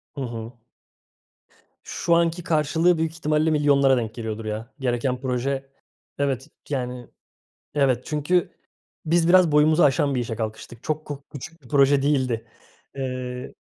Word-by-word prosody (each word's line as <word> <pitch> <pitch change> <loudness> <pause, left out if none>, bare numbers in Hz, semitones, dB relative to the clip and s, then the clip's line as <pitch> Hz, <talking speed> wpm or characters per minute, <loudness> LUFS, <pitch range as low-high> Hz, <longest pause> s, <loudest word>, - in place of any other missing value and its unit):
Hı 140 - -5
hı. 120 -1 -6 1.2
Şu 170 - 0
anki 170 +1 +1
karşılığı 165 +2 +2
büyük 160 0 0
ihtimalle 155 -1 +1
milyonlara 140 -3 +4
denk 115 -2 -3
geliyordur, 110 -1 -5
ya. 110 +2 -5
Gereken 125 0 -1
proje 135 +1 -2 0.5
Evet, 135 -1 -1 0.2
yani, 125 -3 -3 0.7
evet, 130 -4 +2
çünkü 155 +4 0 0.6
biz 165 +1 +3
biraz 180 -3 +6
boyumuzu 155 +3 +5
aşan 140 0 +3
bir 125 - 0
işe 115 -1 -4
kalkıştık. 110 +1 -6
Çok 155 0 -2
ko 145 -1 -7
küçük 155 +3 -9
bir 125 - -16
proje 140 0 +4
değildi. 130 -5 +1 0.5
Eee 125 -1 -5
140 Hz, 135 wpm, -24 LUFS, 125-155 Hz, 1.2 s, biraz